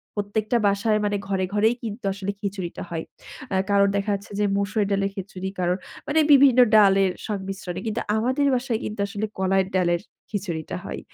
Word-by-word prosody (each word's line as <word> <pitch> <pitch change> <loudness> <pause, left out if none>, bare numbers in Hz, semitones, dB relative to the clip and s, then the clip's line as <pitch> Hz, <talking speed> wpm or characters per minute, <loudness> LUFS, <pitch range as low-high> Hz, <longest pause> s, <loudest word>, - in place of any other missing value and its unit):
প্রত্যেকটা 210 +3 0
বাসায় 210 +2 +2
মানে 205 0 0
ঘরে, 190 -1 0
ঘরেই, 220 +3 +3
কিন্তু 220 -1 -6
আসলে 200 0 -3
খিচুড়িটা 195 -4 -4
হয়। 165 -1 -3 0.5
আ - - +2
কারণ 200 0 +4
দেখা 200 +1 0
যাচ্ছে 200 +1 -9
যে, 210 - +3
মসুর 205 +1 0
ডালের 195 0 +1
খিচুড়ি 190 -1 -5
কারোর 180 0 +1 0.3
মানে 310 +2 +2
বিভিন্ন 270 -3 +7 0.2
ডালের 195 -2 +5 0.2
সংমিশ্রণে 195 -3 -4
কিন্তু 215 - -1
আমাদের 255 +6 +1
বাসায় 245 -3 -1
কিন্তু 215 - -6
আসলে 210 +1 -3
কলাইয়ের 190 0 +2
ডালের 175 -2 +2 0.3
খিচুড়িটা 175 - -4
হয়। - - -5
200 Hz, 165 wpm, -24 LUFS, 190-215 Hz, 0.5 s, বিভিন্ন